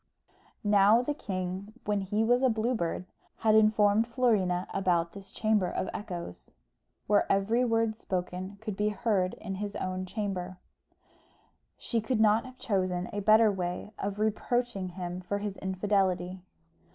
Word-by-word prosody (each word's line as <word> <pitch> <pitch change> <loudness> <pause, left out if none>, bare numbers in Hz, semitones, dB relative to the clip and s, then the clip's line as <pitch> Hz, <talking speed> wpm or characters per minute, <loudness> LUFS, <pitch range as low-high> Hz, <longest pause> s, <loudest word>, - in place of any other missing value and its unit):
Now 205 +3 +5
the 295 - -1
king, 190 -3 -4
when 205 -1 0
he 205 +3 0
was 245 +2 +3
a 260 - +4
Blue 225 +2 0
Bird, 170 -4 -2 0.4
had 215 - +6
informed 215 0 +4
Florina 210 -7 +1
about 175 -3 +1
this 195 -1 -11
Chamber 215 -3 +1
of 185 - -2
Echoes, 175 - -7 0.6
where 205 0 +2
every 215 +5 +2
word 225 -2 +1
spoken 185 +1 -4
could 215 -3 -4
be 210 +2 +1
heard 210 -4 0
in 195 - -6
his 205 -1 -4
own 185 0 -3
chamber; 185 -3 -4 1.2
she 230 -2 -1
could 230 +1 -1
not 220 +2 +4
have 255 0 -11
chosen 185 -5 -1
a 205 - -2
better 215 +1 +5
way 180 +1 -4
of 200 0 -3
reproaching 220 -1 -1
him 180 0 -5
for 195 +3 -2
his 205 -1 -4
infidelity. 190 -1 0
205 Hz, 150 wpm, -29 LUFS, 185-220 Hz, 1.2 s, had